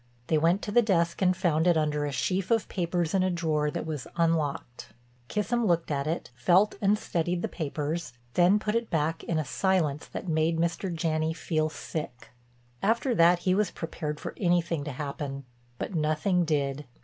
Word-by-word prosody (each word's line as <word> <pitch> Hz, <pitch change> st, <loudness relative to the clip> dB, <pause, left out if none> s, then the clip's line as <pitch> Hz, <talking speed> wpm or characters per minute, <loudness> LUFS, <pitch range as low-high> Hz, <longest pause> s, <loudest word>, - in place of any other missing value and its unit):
They 160 Hz, -, +4 dB
went 170 Hz, +5 st, +2 dB
to 205 Hz, -, -3 dB
the 240 Hz, -, +6 dB
desk 170 Hz, -6 st, +1 dB
and 185 Hz, -1 st, +3 dB
found 170 Hz, -3 st, +2 dB
it 175 Hz, -2 st, +4 dB
under 150 Hz, -1 st, 0 dB
a -, -, -3 dB
sheaf 185 Hz, +6 st, -1 dB
of 230 Hz, -2 st, +2 dB
papers 175 Hz, -2 st, -1 dB
in 190 Hz, -, +3 dB
a 185 Hz, -, +2 dB
drawer 160 Hz, -4 st, 0 dB
that -, -, -4 dB
was 150 Hz, -5 st, -4 dB
unlocked. 155 Hz, -7 st, -1 dB, 0.3 s
Kissam 225 Hz, -, 0 dB
looked 170 Hz, -3 st, +1 dB
at 140 Hz, 0 st, -1 dB
it, 160 Hz, -6 st, -3 dB
felt 175 Hz, -, +3 dB
and 205 Hz, +1 st, +3 dB
studied 175 Hz, -2 st, -2 dB
the -, -, +1 dB
papers, 155 Hz, -2 st, -3 dB, 0.2 s
then 180 Hz, +3 st, +5 dB
put 210 Hz, 0 st, -2 dB
it 230 Hz, 0 st, -1 dB
back 160 Hz, 0 st, 0 dB
in 165 Hz, -, -1 dB
a 155 Hz, -, 0 dB
silence 160 Hz, -1 st, 0 dB
that -, -, -7 dB
made 160 Hz, 0 st, +1 dB
Mr. 170 Hz, +3 st, -1 dB
Janney 160 Hz, -1 st, 0 dB
feel 155 Hz, -1 st, -1 dB
sick. 150 Hz, -4 st, -6 dB, 0.5 s
After 230 Hz, +5 st, +2 dB
that 175 Hz, -2 st, +5 dB
he 185 Hz, -, +4 dB
was 205 Hz, 0 st, +2 dB
prepared 155 Hz, -3 st, -5 dB
for -, -, -6 dB
anything 170 Hz, -4 st, +1 dB
to 150 Hz, -, -4 dB
happen, 140 Hz, 0 st, -5 dB, 0.3 s
but -, -, -4 dB
nothing 165 Hz, +3 st, +1 dB
did. 145 Hz, -2 st, -1 dB
165 Hz, 185 wpm, -28 LUFS, 155-185 Hz, 0.5 s, the